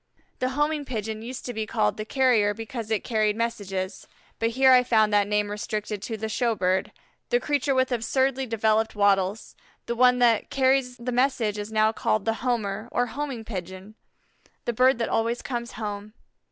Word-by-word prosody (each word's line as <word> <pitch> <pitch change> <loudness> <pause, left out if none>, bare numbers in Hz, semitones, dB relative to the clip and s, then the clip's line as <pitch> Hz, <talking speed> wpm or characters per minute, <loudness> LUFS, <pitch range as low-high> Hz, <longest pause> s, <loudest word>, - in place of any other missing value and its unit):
The 255 - 0
Homing 295 0 +1
Pigeon 220 -4 -4
used 245 +3 -7
to 245 - -4
be 215 -1 -3
called 105 - +1
the 215 - -5
Carrier 225 -5 +2
because 225 0 -6
it 220 -3 0
carried 215 -3 +1
messages, 200 -5 -3 0.3
but 230 - +1
here 260 +3 +4
I 250 -1 +7
found 220 -4 +2
that 205 -1 +3
name 210 0 0
restricted 210 0 -4
to 220 +1 -4
the 220 +1 -3
show 230 +1 0
bird, 185 -1 0 0.4
the 485 - +3
creature 285 - 0
with 260 0 +2
absurdly 260 +3 0
developed 220 0 +1
wattles; 200 0 +1 0.3
the 235 - -2
one 250 +1 +4
that 235 -3 +3
carries 260 -2 +1
the 245 +1 -4
messages 230 -5 0
is - - -13
now 215 0 +3
called 215 -2 -1
the 225 - +2
Homer, 225 -3 -2
or 245 - +1
Homing 250 -1 -5
Pigeon 190 0 -7 0.7
the 240 - -1
bird 255 +2 +4
that 230 - -1
always 230 +2 0
comes 240 -2 -4
home. 210 -1 -6
225 Hz, 180 wpm, -25 LUFS, 210-250 Hz, 0.7 s, I